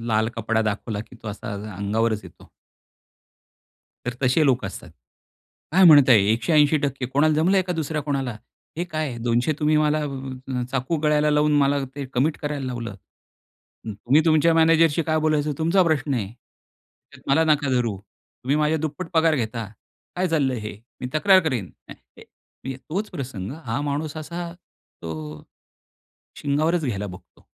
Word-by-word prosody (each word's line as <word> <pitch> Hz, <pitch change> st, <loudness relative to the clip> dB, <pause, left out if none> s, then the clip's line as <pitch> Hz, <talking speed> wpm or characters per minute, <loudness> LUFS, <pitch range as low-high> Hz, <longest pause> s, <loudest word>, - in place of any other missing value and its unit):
लाल 110 Hz, -1 st, +1 dB
कपडा 110 Hz, 0 st, 0 dB
दाखवला 110 Hz, 0 st, -3 dB
की 115 Hz, +3 st, -12 dB
तो 110 Hz, -, -6 dB
असा 100 Hz, 0 st, -6 dB
अ-अंगावरच 105 Hz, +2 st, -2 dB
येतो. -, -, -15 dB, 1.6 s
तर 125 Hz, -, -2 dB
तसे 130 Hz, +5 st, +3 dB
लोक 125 Hz, -4 st, +2 dB
असतात. 95 Hz, -3 st, -7 dB, 0.8 s
काय 190 Hz, +1 st, +6 dB
म्हणताय? 140 Hz, -7 st, +8 dB
180% 140 Hz, +1 st, +2 dB
कोणाला 145 Hz, +4 st, +2 dB
जमलंय 185 Hz, +5 st, +3 dB
का 180 Hz, 0 st, -3 dB
दुसऱ्या 160 Hz, -2 st, -2 dB
कोणाला? 135 Hz, -5 st, -2 dB, 0.4 s
हे 175 Hz, -, 0 dB
काय? 155 Hz, -7 st, -3 dB
200 120 Hz, +5 st, +1 dB
तुम्ही 155 Hz, +1 st, +3 dB
मला 150 Hz, 0 st, +2 dB
अ, 130 Hz, -2 st, -5 dB
चाकू 135 Hz, +5 st, -1 dB
गळ्याला 150 Hz, 0 st, +3 dB
लावून 150 Hz, 0 st, +3 dB
मला 140 Hz, 0 st, +3 dB, 0.2 s
ते 145 Hz, -, -5 dB
कमिट 145 Hz, +5 st, +1 dB
करायला 145 Hz, -2 st, -3 dB
लावलं 120 Hz, -3 st, -4 dB, 1.0 s
हं 110 Hz, -, -4 dB
तुम्ही 125 Hz, +9 st, +3 dB
तुमच्या 160 Hz, +1 st, +4 dB
मॅनेजरशी 165 Hz, -1 st, +4 dB
काय 155 Hz, 0 st, 0 dB
बोलायचं 155 Hz, -1 st, +1 dB
तुमचा 170 Hz, +4 st, +3 dB
प्रश्न 150 Hz, -4 st, 0 dB
आहे. 110 Hz, -6 st, -1 dB, 0.9 s
त्यात -, -, -15 dB
मला 160 Hz, +4 st, +4 dB
नका 145 Hz, -2 st, 0 dB
धरू. 120 Hz, -5 st, 0 dB
तुम्ही 125 Hz, +6 st, -5 dB
माझ्या 155 Hz, +1 st, +1 dB
दुप्पट 160 Hz, +3 st, -4 dB
पगार 160 Hz, -1 st, +4 dB
घेता. 115 Hz, -2 st, -3 dB, 0.5 s
काय 185 Hz, +1 st, 0 dB
चाललंय 135 Hz, -7 st, +1 dB
हे? 105 Hz, -1 st, -6 dB, 0.2 s
मी 125 Hz, -, -3 dB
तक्रार 190 Hz, +4 st, +5 dB
करीन? 110 Hz, -10 st, -3 dB, 0.2 s
अ, -, -, -7 dB, 0.3 s
ए -, -, -12 dB, 0.4 s
मग 130 Hz, 0 st, -4 dB
तोच 195 Hz, +7 st, -3 dB
प्रसंग 120 Hz, -8 st, -6 dB, 0.2 s
हा 115 Hz, +4 st, -1 dB
माणूस 145 Hz, +2 st, -3 dB
असा 170 Hz, +2 st, -6 dB, 0.5 s
तो 80 Hz, -1 st, -5 dB, 0.2 s
अ, -, -, -16 dB, 1.0 s
शिंगावरच 155 Hz, +3 st, +1 dB
घ्यायला 105 Hz, -5 st, -2 dB
बघतो. 90 Hz, -1 st, -13 dB
140 Hz, 155 wpm, -23 LUFS, 120-155 Hz, 1.6 s, म्हणताय